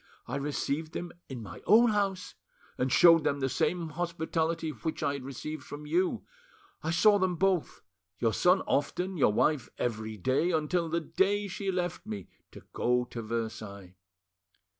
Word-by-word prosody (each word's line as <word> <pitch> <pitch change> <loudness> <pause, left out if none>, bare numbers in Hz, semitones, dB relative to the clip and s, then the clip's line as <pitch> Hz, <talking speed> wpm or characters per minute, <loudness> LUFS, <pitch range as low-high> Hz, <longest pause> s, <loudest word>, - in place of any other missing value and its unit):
I - - -4
received 145 +2 -2
them 175 0 -5 0.2
in 125 -4 -6
my 90 -4 -9
own 225 +4 +6
house, 195 -3 -1 0.4
and 130 +1 -1
showed 165 +2 +7
them 140 - 0
the 135 - +1
same 170 +5 0
hospitality 165 0 -2
which 155 +4 -4
I 140 - +1
had 140 -2 -5
received 140 +3 -6
from 145 +3 -8
you. 175 +5 0 0.6
I 160 - -3
saw 205 +5 +5
them 185 -2 +1
both, 185 -1 0 0.3
your 115 -2 +1
son 180 - +4
often, 180 +6 -1
your 140 -9 +4
wife 145 +6 +1
every 110 -2 -3
day, 130 - +1
until 165 +1 0
the 170 +1 0
day 200 +5 +1
she 195 +1 -3
left 180 -1 -3
me 105 -4 -6 0.2
to - - -12
go 125 0 +1
to 115 - -4
Versailles. 110 -4 -5
160 Hz, 160 wpm, -30 LUFS, 130-180 Hz, 0.6 s, showed